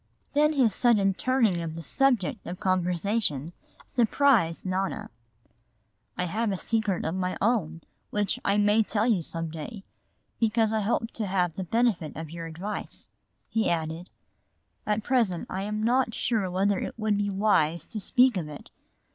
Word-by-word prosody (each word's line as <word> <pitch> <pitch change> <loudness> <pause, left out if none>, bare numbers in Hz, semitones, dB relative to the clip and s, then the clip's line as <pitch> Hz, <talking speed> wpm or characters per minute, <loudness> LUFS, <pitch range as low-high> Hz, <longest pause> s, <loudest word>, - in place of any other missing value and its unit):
Then 300 +2 +4
his 250 -8 +3
sudden 205 -5 +3
turning 225 -5 +1
of 160 -1 -5
the 165 - -7
subject 240 - +1
of 180 +2 -6
conversation 180 -4 0 0.3
surprised 230 - +2
Nona. 190 +1 -2 1.1
"I 180 - 0
have 215 +5 -1
a 190 - -1
secret 215 -3 0
of 160 - -1
my 185 0 -2
own 185 -8 0 0.3
which 205 -1 0
I 200 +1 +2
may 210 +1 +4
some 200 -7 0
day 160 - -7
tell - - -5
you, 210 -4 -10 0.6
because 225 -1 +2
I 220 - +1
hope 225 +2 -1
to 215 -3 -4
have 180 -3 +1
the 190 - -3
benefit 205 -5 0
of 160 -1 -7
your 165 0 -6
advice," 180 +6 -5 0.4
he 225 -1 0
added. 165 +1 -2 0.8
"At 210 0 0
present 225 -10 +1
I 190 - -2
am 210 +2 -3
not 240 0 +2
sure 215 -6 0
whether 190 +2 +1
it - - -5
would 215 -2 +1
be 205 0 0
wise 190 -5 +2
to 220 - -6
speak 250 +2 +3
of 160 -4 -3
it. 145 - -11
200 Hz, 165 wpm, -27 LUFS, 175-225 Hz, 1.1 s, Then